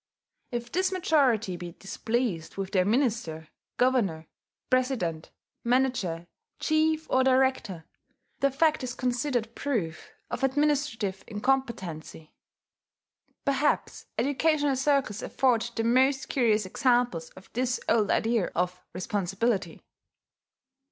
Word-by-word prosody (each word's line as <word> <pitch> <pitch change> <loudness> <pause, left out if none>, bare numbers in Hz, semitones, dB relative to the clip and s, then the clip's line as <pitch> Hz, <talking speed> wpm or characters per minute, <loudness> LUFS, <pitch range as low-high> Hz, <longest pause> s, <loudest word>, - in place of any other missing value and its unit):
If 240 -1 -4
this 375 +1 +1
majority 265 - +2
be 175 -1 -7
displeased 210 -4 -3
with 195 -1 -3
their 185 -2 +3
minister, 215 - 0 0.3
governor, 220 -11 +2 0.5
president, 245 -12 0 0.3
manager, 235 -9 +1 0.3
chief, 315 0 +2
or 260 - +3
director, 260 -10 +1 0.5
the 275 - +3
fact 305 +2 +2
is 250 -1 -4
considered 245 -2 -1
proof 210 - -3 0.2
of - - -3
administrative 270 -8 0
incompetency.... 210 -10 -2 1.1
Perhaps 280 +1 0
educational 285 +3 +2
circles 265 -5 +1
afford 240 -3 +1
the 225 - 0
most 260 +4 +3
curious 220 -5 +2
examples 240 -6 +1
of 185 - -15
this 250 +1 0
old 220 -3 +3
idea 225 -4 +2
of 180 +1 -1
responsibility. 195 0 -1
240 Hz, 105 wpm, -28 LUFS, 190-265 Hz, 1.1 s, their